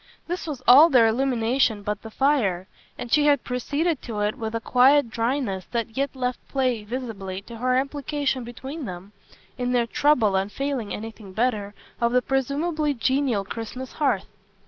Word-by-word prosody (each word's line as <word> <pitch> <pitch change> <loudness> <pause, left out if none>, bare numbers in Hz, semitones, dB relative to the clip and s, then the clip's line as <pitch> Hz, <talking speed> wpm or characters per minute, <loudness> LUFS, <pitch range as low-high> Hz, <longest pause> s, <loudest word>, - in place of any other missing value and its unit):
This 350 0 -4
was 275 -5 -5
all 285 +7 +9
their 250 -6 +6
illumination 235 -2 +1
but 210 0 -3
the 225 - -9
fire, 220 -9 +1 0.3
and 240 - -7
she 295 0 +4
had 285 -3 +3
proceeded 285 +5 -1
to 215 -3 -4
it 210 +1 +1
with 220 0 -4
a - - 0
quiet 255 +2 +4
dryness 230 -5 -1
that 230 -1 -4
yet 275 +1 -1
left 250 -1 -2
play, 255 -5 0
visibly, 210 -5 -5
to 235 +2 -10
her 255 +1 +2
implication 275 -1 -1
between 265 +5 -7
them, 185 0 -8 0.5
in 250 0 0
their 240 -1 +3
trouble 230 -5 +2
and 195 +2 0
failing 275 -5 -3
anything 215 -3 -7
better, 210 -2 -1 0.3
of 235 0 +2
the 250 0 +3
presumably 290 +4 0
genial 260 -4 +1
Christmas 235 +5 -6
hearth. 265 -11 0
245 Hz, 170 wpm, -24 LUFS, 220-275 Hz, 0.5 s, all